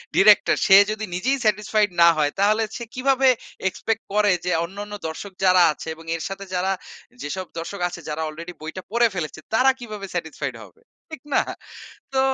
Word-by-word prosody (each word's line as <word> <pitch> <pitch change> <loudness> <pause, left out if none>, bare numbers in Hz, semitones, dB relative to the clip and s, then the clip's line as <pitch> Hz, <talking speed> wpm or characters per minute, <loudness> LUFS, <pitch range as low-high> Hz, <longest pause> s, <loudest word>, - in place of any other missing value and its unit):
Director 205 +1 +6
সে 195 - +9
যদি 215 0 -3
নিজেই 260 +9 +1
satisfied 210 0 +2
না 170 - +8
হয় 145 -1 +2
তাহলে 215 +2 +3
সে 240 - -6
কিভাবে 265 +1 +2 0.4
expect 225 +4 -3
করে 210 -1 +4
যে, 180 - 0
অন্যান্য 205 +3 -8
দর্শক 190 +5 -7
যারা 185 -1 +6
আছে - - -10
এবং 165 - -14
এর 160 - -5
সাথে 195 0 -6
যারা 185 +2 +1 0.5
যেসব 185 +5 -4
দর্শক 180 +3 -6
আছে 175 -1 -9
যারা 155 +1 -3
আলরেডি 170 +3 -8
বইটা 160 +4 -7
পড়ে 235 +1 +4
ফেলেছে 155 -2 -4
তারা 260 +4 +5
কিভাবে 215 -4 -7
satisfied 160 -2 -4
হবে। 460 - -18 0.3
ঠিক 315 -5 -9
না? - - +5 0.7
তো 265 - +3
200 Hz, 175 wpm, -23 LUFS, 175-220 Hz, 0.7 s, সে